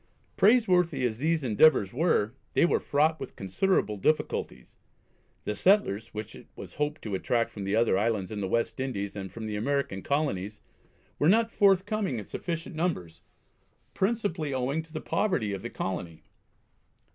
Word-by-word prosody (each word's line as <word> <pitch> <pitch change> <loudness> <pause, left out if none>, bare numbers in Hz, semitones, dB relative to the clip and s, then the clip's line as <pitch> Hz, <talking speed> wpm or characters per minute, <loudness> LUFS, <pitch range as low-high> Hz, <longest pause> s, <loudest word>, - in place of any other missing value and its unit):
Praiseworthy 180 - +3
as 115 -2 -2
these 160 +1 +1
endeavours 115 -3 +4
were 125 -7 +1 0.2
they - - +4
were - - +2
fraught 155 +2 +1
with - - -7
considerable 105 - 0
difficulties. 95 - -1 0.7
The 105 - -3
settlers 115 - +2
which 110 0 -7
it - - -13
was - - -10
hoped 150 +1 -2
to 105 - -5
attract 115 +5 0
from 100 -2 -6
the 100 +2 0
other 115 -4 +3
islands 105 -3 -1
in 105 -1 -4
the 95 - -1
West 115 +6 -1
Indies 100 -7 -3
and 95 -2 -6
from 115 -1 -7
the 105 -1 -3
American 125 -3 -1
Colonies 105 -8 -1 0.6
were 150 - +4
not 225 +3 +3
forthcoming 200 - +2
in 105 - -5
sufficient 165 -2 -5
numbers, 90 - -2 0.7
principally 190 -8 -1
owing 135 +5 -1
to 160 0 -18
the 155 - -5
poverty 160 - 0
of 95 - -4
the 120 - -5
colony. 90 -6 -5
130 Hz, 160 wpm, -28 LUFS, 105-165 Hz, 0.7 s, endeavours